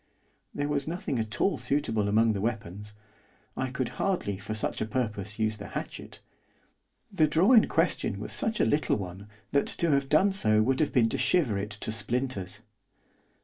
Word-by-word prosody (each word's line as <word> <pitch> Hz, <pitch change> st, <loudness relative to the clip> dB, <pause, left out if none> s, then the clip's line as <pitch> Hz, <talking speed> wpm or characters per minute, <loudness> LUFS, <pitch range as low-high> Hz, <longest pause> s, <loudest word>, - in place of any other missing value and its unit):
There 145 Hz, 0 st, -2 dB
was 145 Hz, -1 st, -1 dB
nothing 165 Hz, -6 st, -2 dB
at 110 Hz, -1 st, -4 dB
all 195 Hz, -, +1 dB
suitable 115 Hz, -8 st, 0 dB
among 110 Hz, +1 st, +3 dB
the 100 Hz, -, -3 dB
weapons, 105 Hz, -2 st, -3 dB, 0.6 s
I 130 Hz, -, -2 dB
could 125 Hz, -1 st, -2 dB
hardly 140 Hz, -, -1 dB
for 110 Hz, +2 st, -5 dB
such 110 Hz, -, -3 dB
a 110 Hz, -, -1 dB
purpose 105 Hz, -4 st, -3 dB
use 110 Hz, -1 st, 0 dB
the 100 Hz, -1 st, -8 dB
hatchet; -, -, -7 dB, 0.9 s
the 165 Hz, -6 st, +3 dB
drawer 175 Hz, -, +4 dB
in 220 Hz, -, +6 dB
question -, -, 0 dB
was -, -, -1 dB
such 220 Hz, -, +1 dB
a -, -, +4 dB
little 150 Hz, -, +2 dB
one 95 Hz, +1 st, -7 dB, 0.2 s
that 140 Hz, 0 st, +2 dB
to 170 Hz, -2 st, +2 dB
have 140 Hz, -1 st, +1 dB
done 185 Hz, +7 st, +4 dB
so 110 Hz, -, +3 dB
would 130 Hz, +3 st, +1 dB
have 155 Hz, -, +1 dB
been 115 Hz, -4 st, +3 dB
to -, -, -2 dB
shiver 150 Hz, -, +2 dB
it 100 Hz, +1 st, -4 dB
to 105 Hz, 0 st, -5 dB
splinters. 110 Hz, -3 st, -2 dB
115 Hz, 185 wpm, -28 LUFS, 105-145 Hz, 0.9 s, in